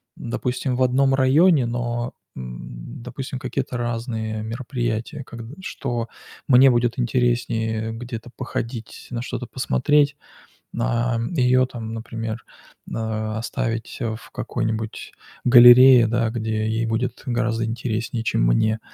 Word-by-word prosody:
допустим, 125 Hz, +2 st, -2 dB
в 130 Hz, -, -2 dB
одном 135 Hz, +2 st, +3 dB
районе, 140 Hz, +2 st, +4 dB
но, 120 Hz, 0 st, -2 dB, 0.2 s
м, -, -, -8 dB
допустим, 130 Hz, +1 st, -6 dB
какие-то 130 Hz, -1 st, -3 dB
разные 115 Hz, -2 st, -3 dB
мероприятия 120 Hz, +3 st, -3 dB
как 115 Hz, -2 st, -10 dB, 0.2 s
что 120 Hz, -10 st, -3 dB, 0.4 s
мне 130 Hz, 0 st, +7 dB
будет 120 Hz, +1 st, +1 dB
интереснее 115 Hz, -2 st, 0 dB
где-то 115 Hz, +1 st, -7 dB
походить, 115 Hz, -2 st, -5 dB
на 120 Hz, -1 st, -3 dB
что-то -, -, -4 dB
посмотреть, 145 Hz, -, +2 dB, 0.6 s
на 120 Hz, 0 st, 0 dB
ее 130 Hz, -4 st, +3 dB
там, 115 Hz, -3 st, -7 dB
например, 115 Hz, 0 st, -5 dB, 0.5 s
э, -, -, -7 dB, 0.4 s
оставить 115 Hz, 0 st, -3 dB
в 110 Hz, -2 st, -4 dB
какой-нибудь 110 Hz, -1 st, -3 dB, 0.3 s
галерее, 125 Hz, 0 st, +9 dB
да, 115 Hz, 0 st, +1 dB
где 110 Hz, -1 st, -2 dB
ей 110 Hz, +1 st, 0 dB
будет 115 Hz, +2 st, -2 dB
гораздо 120 Hz, -2 st, 0 dB
интереснее, 115 Hz, 0 st, -3 dB
чем -, -, 0 dB
мне. 110 Hz, -, +2 dB
120 Hz, 115 wpm, -23 LUFS, 115-125 Hz, 0.6 s, галерее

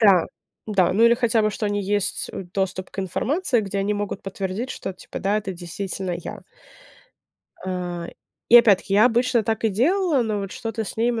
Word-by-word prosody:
Да, 195 Hz, -6 st, +5 dB, 0.4 s
да, 195 Hz, -5 st, +2 dB
ну, 225 Hz, +4 st, +4 dB
или 235 Hz, 0 st, +6 dB
хотя 235 Hz, -2 st, +2 dB
бы, 215 Hz, -, +2 dB
что 210 Hz, +1 st, -3 dB
они 205 Hz, 0 st, -1 dB
есть, 205 Hz, 0 st, -1 dB
э- -, -, -5 dB
доступ 190 Hz, -1 st, -2 dB
к 190 Hz, -, -15 dB
информации, 250 Hz, -, 0 dB
где 200 Hz, -1 st, -3 dB
они 200 Hz, +2 st, 0 dB
могут 205 Hz, -1 st, -4 dB
подтвердить, 195 Hz, +5 st, -4 dB
что 190 Hz, -, -5 dB
типа, -, -, -9 dB
да, 200 Hz, +2 st, +1 dB
это 200 Hz, -3 st, -3 dB
действительно 180 Hz, +1 st, -4 dB
я. 170 Hz, -, -8 dB, 1.2 s
А, 180 Hz, -2 st, -4 dB, 0.4 s
и 240 Hz, -, +9 dB
опять-таки, 200 Hz, -4 st, +5 dB
я 210 Hz, +2 st, +6 dB
обычно 240 Hz, -1 st, +2 dB
так 220 Hz, +1 st, -2 dB
и -, -, +5 dB
делала, 300 Hz, -, +2 dB
но 215 Hz, -3 st, -1 dB
вот 195 Hz, 0 st, -5 dB
что-то 225 Hz, -1 st, -4 dB
с -, -, -7 dB
ней 235 Hz, +2 st, +2 dB
мы 230 Hz, -2 st, -2 dB
205 Hz, 200 wpm, -23 LUFS, 190-230 Hz, 1.2 s, и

